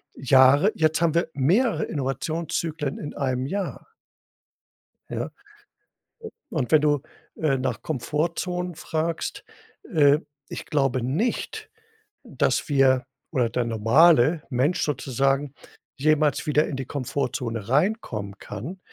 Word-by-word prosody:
Jahre. 135 - +5
Jetzt 160 0 +1
haben 165 -2 +3
wir 170 - +1
mehrere 190 - +2
Innovationszyklen 150 +2 -3
in 145 - -6
einem 130 -2 -1
Jahr. 195 +6 -4 1.2
Ja. - - -3 1.3
U 185 - -7
Und 130 -6 -1
wenn 155 - +7
du, 145 -1 +2 0.4
äh, 140 -4 +1
nach 125 -4 -3
Komfortzonen 170 +5 -2
fragst, 160 +1 -3 0.5
äh, 145 -2 +5 0.3
ich - - -7
glaube 135 -4 +1
nicht, 155 - -2 0.5
dass - - 0
wir 135 -2 +3 0.3
oder 125 -3 +1
der 120 +1 -1
normale 135 +7 +4
Mensch 140 +8 +1
sozusagen 135 0 0 0.4
jemals 155 +1 +2
wieder 150 0 +2
in 145 - -4
die 135 0 -4
Komfortzone 125 -5 -3
reinkommen 130 - 0
kann. 130 - -7
145 Hz, 115 wpm, -24 LUFS, 130-160 Hz, 1.3 s, wenn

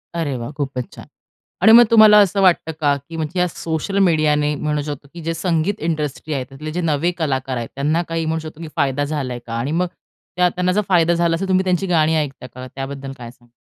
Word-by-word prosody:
अरे 155 -5 -2
वाह! 120 +3 -6
खूपच 135 -4 -4
छान. - - -11 0.6
आणि 220 - +7
मग 240 +1 +10
तुम्हाला 215 -2 +8
असं 200 0 +1
वाटतं 175 -3 +3
का 145 -2 +2
की 165 - -8
म्हणजे 160 +3 -3
या 180 - +3
सोशल 165 +3 -3
मीडियाने 155 -5 +2
म्हणू 150 +1 -2
शकतो, 145 -1 -7
की 170 - -9
जे 165 +1 -2
संगीत 170 +3 -1
इंडस्ट्री 155 -1 -3
आहे, 135 -3 -2
त्यातले 150 +3 -7
जे 175 +3 -2
नवे 165 +1 +1
कलाकार 135 -5 -2
आहेत 115 -1 -5
त्यांना 150 +5 +1
काही 165 0 -2
म्हणू 160 +1 -1
शकतो 155 +1 -11
की 165 - -6
फायदा 145 -2 0
झालाय 135 -5 -3
का? 115 - -7
आणि 120 +5 -2
मग 180 +3 0 0.5
त्यांना 180 0 +1
जर 205 +3 +2
फायदा 170 -2 +4
झाला 170 -1 +1
असेल 185 +4 -3
तर - - -8
तुम्ही 185 0 +3
त्यांची 185 +1 0
गाणी 160 -2 +2
ऐकता 140 -4 -3
का? 130 +1 -10
त्याबद्दल 135 0 -6
काय 120 -2 -9
सांगाल? 120 -1 -26
155 Hz, 225 wpm, -20 LUFS, 140-175 Hz, 0.6 s, मग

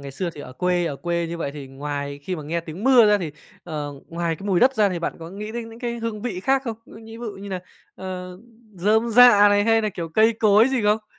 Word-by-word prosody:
ngày 140 -1 -8
xưa 170 +6 -3
thì 150 - -11
ở 130 - -9
quê 175 +4 0
ở 140 - -3
quê 170 +1 -2
như 170 0 -6
vậy, 140 - -3
thì 145 -2 -8
ngoài 140 +1 -5
khi 180 +3 -4
mà 155 - -7
nghe 165 +3 -2
tiếng 170 +7 -8
mưa 250 -5 +7
ra, 210 0 +4
thì, 165 -5 -4 0.3
ờ, 150 -4 -5 0.2
ngoài 170 -1 -2
cái 200 - -9
mùi 185 -3 +2
đất 265 +1 +5
ra, 210 -3 +3
thì 180 -2 -3
bạn 170 - -3
có 165 +1 -9
nghĩ 210 +3 -7
đến 235 -1 -5
những 225 +1 -12
cái 235 -1 -4
hương 225 -2 -4
vị 195 -7 -3
khác 270 +4 +1
không? 230 -3 -4
Ngư - - -14
nhĩ 225 0 -11
bự 220 -5 -6
như 200 +1 -9
nà, 185 -2 -4 0.3
ờ, 180 -1 -7 0.4
rơm 215 +6 +2
rạ 220 -3 +8
này, 205 0 +3
hay 225 0 +4
nà, 215 - -1
kiểu, 170 -4 -5
cây 220 +7 +3
cối 215 +2 +4
gì 260 -4 0
không? 210 +1 +1
195 Hz, 275 wpm, -23 LUFS, 170-225 Hz, 0.4 s, rạ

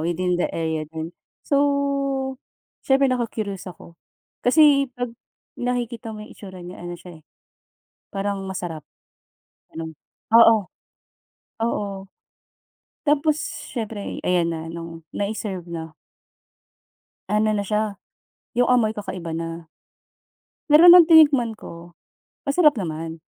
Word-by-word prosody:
within 175 +1 0
the - - +1
area 160 -1 -2
lang. 160 +1 -5 0.3
So, 275 -2 0 0.4
siyempre 270 0 +3
naku-curious 215 -6 -3
ako, 170 -1 -13 0.4
kasi 280 +1 +5
pag 245 -1 -3 0.5
nakikita 240 -2 -3
mo 210 0 -8
yung - - -15
hitsura 185 -3 -11
niya, 180 +1 -9
ano 175 0 -6
siya, 170 -2 -13
eh. - - -32 0.9
Parang 200 0 -3
masarap, 175 -5 -5 0.9
ganun 160 0 -7 0.4
oo. 225 -3 +7 1.0
Oo. 200 -4 -3 1.0
Tapos, 295 +1 +2 0.4
siyempre 220 -4 -4
ayan 175 -2 +2
na 160 -1 -5
nung 165 -1 -8
nai-serve 200 -3 -4
na 160 -1 -6 1.4
ano 215 +1 +2
na 205 - -1
siya, 210 0 -1 0.6
yung 245 - +5
amoy 235 -3 +3
kakaiba 195 -5 -6
na. 165 0 -5 1.0
Pero 315 +3 +8
nung 350 -1 +9
tinikman 290 -8 +6
ko, 170 -4 -11 0.5
masarap 295 -3 +4
naman. 165 -2 -5
205 Hz, 110 wpm, -23 LUFS, 170-250 Hz, 1.4 s, nung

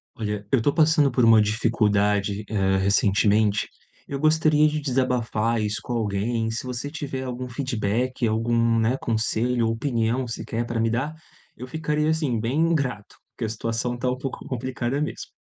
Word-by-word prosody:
Olha, 105 -2 -4
eu 135 - +3
tô 140 +5 +2
passando 155 -3 +4
por 125 0 +2
uma 115 -1 +7
dificuldade, 105 -2 +1
eh, 95 -3 +1
recentemente, 100 +2 +2 0.4
eu 140 - -4
gostaria 155 0 +4
de 155 0 -1
desabafar 120 -4 0
isso 105 0 -2
com 125 - -4
alguém. 115 +1 -1
Se 110 - -4
você 125 +2 -4
tiver 140 -4 -4
algum 125 0 -5
feedback, 125 0 -1
algum, 115 +1 +2
né, 115 +4 +1
conselho 115 +1 0
ou 115 - +1
opinião 120 0 -1
sequer 115 0 -4
para 120 -1 -3
me 115 0 +2
dar, 130 +7 -2 0.4
eu 125 - -8
ficaria, 150 +1 -1
assim, 150 -7 0
bem 150 +9 +1
grato, 125 -8 -3 0.2
porque 120 - -5
a - - -2
situação 115 +2 -2
tá 125 +1 -1
um 125 - -3
pouco 135 +1 -6
complicada 130 +1 -2
mesmo. 150 - -4
120 Hz, 165 wpm, -24 LUFS, 110-130 Hz, 0.4 s, uma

